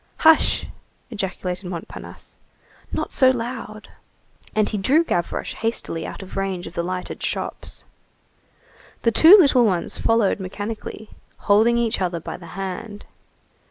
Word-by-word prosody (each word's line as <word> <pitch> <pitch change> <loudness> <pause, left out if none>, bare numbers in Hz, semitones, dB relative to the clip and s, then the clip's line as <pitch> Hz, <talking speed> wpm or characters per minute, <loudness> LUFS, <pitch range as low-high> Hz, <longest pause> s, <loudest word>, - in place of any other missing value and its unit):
"Hush!" 320 -1 +4 0.5
ejaculated 185 -3 -4
Montparnasse, 170 -3 -9 0.6
"not - - -3
so 260 -2 +5
loud." 230 -3 -4 0.7
And 215 -1 +3
he 210 - -2
drew 280 +12 +4
Gavroche 175 - -2
hastily 220 -7 -3
out - - -8
of 190 - -11
range 195 -2 -2
of - - -9
the 170 - -1
lighted 180 +1 -5
shops. - - -3 1.2
The 230 - +4
two 330 - +9
little 275 -9 +5
ones 185 -6 0
followed 225 -3 +2
mechanically, 205 +3 -6 0.3
holding 220 +3 +4
each 230 -4 0
other 175 -2 -1
by - - -6
the 170 - -12
hand. 200 +2 -6
205 Hz, 130 wpm, -22 LUFS, 185-230 Hz, 1.2 s, two